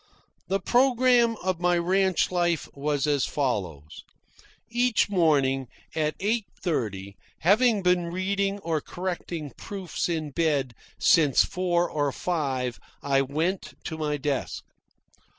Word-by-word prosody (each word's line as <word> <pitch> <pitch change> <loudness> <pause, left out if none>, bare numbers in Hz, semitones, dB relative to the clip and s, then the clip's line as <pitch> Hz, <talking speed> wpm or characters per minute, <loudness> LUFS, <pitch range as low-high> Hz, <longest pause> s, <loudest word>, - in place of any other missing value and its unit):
The 195 +1 0
programme 245 -2 +3
of 185 -2 -1
my 175 0 +2
ranch 185 +1 +2
life 175 -2 0
was 145 0 -1
as 145 -3 +1
follows: 95 - -3 0.6
Each 240 -2 +1
morning, 140 -7 +2 0.3
at 155 -1 0
eight 215 +2 0
thirty, 100 - -3 0.3
having 210 +3 +4
been 180 -1 +2
reading 195 +3 -1
or 160 -3 -1
correcting 175 -4 -5
proofs 190 -3 -4
in 155 -3 -2
bed 140 -5 0 0.2
since 150 -7 +4
four 175 -1 0
or 145 -2 -1
five, 135 -8 -2 0.2
I 135 -1 +2
went 160 +8 -2
to 160 - -5
my 150 -2 -2
desk. 140 -1 -3
170 Hz, 120 wpm, -26 LUFS, 140-190 Hz, 0.6 s, having